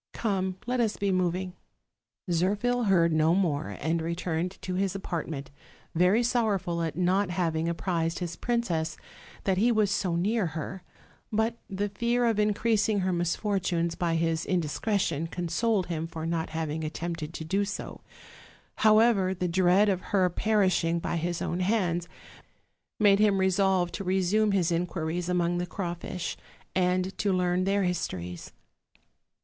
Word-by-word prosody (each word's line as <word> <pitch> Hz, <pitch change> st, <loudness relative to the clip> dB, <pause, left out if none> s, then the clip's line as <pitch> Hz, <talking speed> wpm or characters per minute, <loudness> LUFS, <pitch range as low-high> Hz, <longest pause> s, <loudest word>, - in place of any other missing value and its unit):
Come, 190 Hz, -4 st, -1 dB
let 250 Hz, +1 st, -1 dB
us 220 Hz, -3 st, +1 dB
be 200 Hz, -1 st, 0 dB
moving." 185 Hz, 0 st, 0 dB, 0.8 s
Zirphil 205 Hz, +8 st, +1 dB
heard 170 Hz, -4 st, +4 dB
no 155 Hz, +2 st, +3 dB
more, 145 Hz, -, -1 dB
and 160 Hz, +3 st, 0 dB
returned 170 Hz, +2 st, -2 dB
to 185 Hz, -, -3 dB
his 195 Hz, +1 st, 0 dB
apartment, 160 Hz, -7 st, -4 dB, 0.4 s
very 180 Hz, +8 st, +4 dB
sorrowful 200 Hz, -8 st, 0 dB
at 165 Hz, -3 st, -2 dB
not 185 Hz, +2 st, +2 dB
having 165 Hz, -2 st, 0 dB
apprised 165 Hz, 0 st, -1 dB
his 175 Hz, -1 st, -4 dB
princess 170 Hz, -10 st, -1 dB, 0.5 s
that 190 Hz, -1 st, +1 dB
he 235 Hz, +4 st, +4 dB
was 215 Hz, -3 st, +2 dB
so 190 Hz, -4 st, 0 dB
near 200 Hz, +3 st, +1 dB
her: 180 Hz, +5 st, -5 dB, 0.5 s
but 225 Hz, +2 st, 0 dB
the 200 Hz, +1 st, -1 dB
fear 235 Hz, +4 st, 0 dB
of 225 Hz, -3 st, +2 dB
increasing 210 Hz, 0 st, +2 dB
her 185 Hz, 0 st, 0 dB
mis 175 Hz, -1 st, 0 dB
fortunes 175 Hz, -5 st, 0 dB
by 165 Hz, -1 st, -1 dB
his 165 Hz, 0 st, 0 dB
indiscretion 170 Hz, -1 st, 0 dB
consoled 180 Hz, +4 st, 0 dB
him 165 Hz, -2 st, -3 dB
for 160 Hz, -1 st, -6 dB
not 165 Hz, -1 st, -1 dB
having 160 Hz, -1 st, -3 dB
attempted 160 Hz, 0 st, -4 dB
to 160 Hz, -, -5 dB
do 195 Hz, +5 st, +1 dB
so: 200 Hz, 0 st, -6 dB, 0.8 s
however, 215 Hz, -3 st, +4 dB
the 180 Hz, 0 st, -1 dB
dread 185 Hz, +3 st, +4 dB
of 190 Hz, -3 st, +1 dB
har 185 Hz, -3 st, +1 dB
perishing 185 Hz, -5 st, +2 dB
by 170 Hz, -, -2 dB
his 170 Hz, +1 st, -2 dB
own 175 Hz, -, -2 dB
hands 180 Hz, -3 st, 0 dB, 0.9 s
made 205 Hz, -2 st, +5 dB
him 210 Hz, -2 st, +4 dB
resolve 190 Hz, -1 st, +2 dB
to 200 Hz, -, -5 dB
resume 190 Hz, +3 st, +2 dB
his 180 Hz, -4 st, +1 dB
in 170 Hz, +1 st, +1 dB
quiries 170 Hz, +1 st, -3 dB
among 175 Hz, -1 st, +1 dB
the 175 Hz, -, -2 dB
crawfish, 175 Hz, -1 st, -4 dB, 0.4 s
and 185 Hz, +1 st, +1 dB
to 205 Hz, -, +1 dB
learn 180 Hz, 0 st, +1 dB
their 200 Hz, +1 st, +2 dB
histories. 90 Hz, -, -3 dB
180 Hz, 150 wpm, -28 LUFS, 170-200 Hz, 0.9 s, made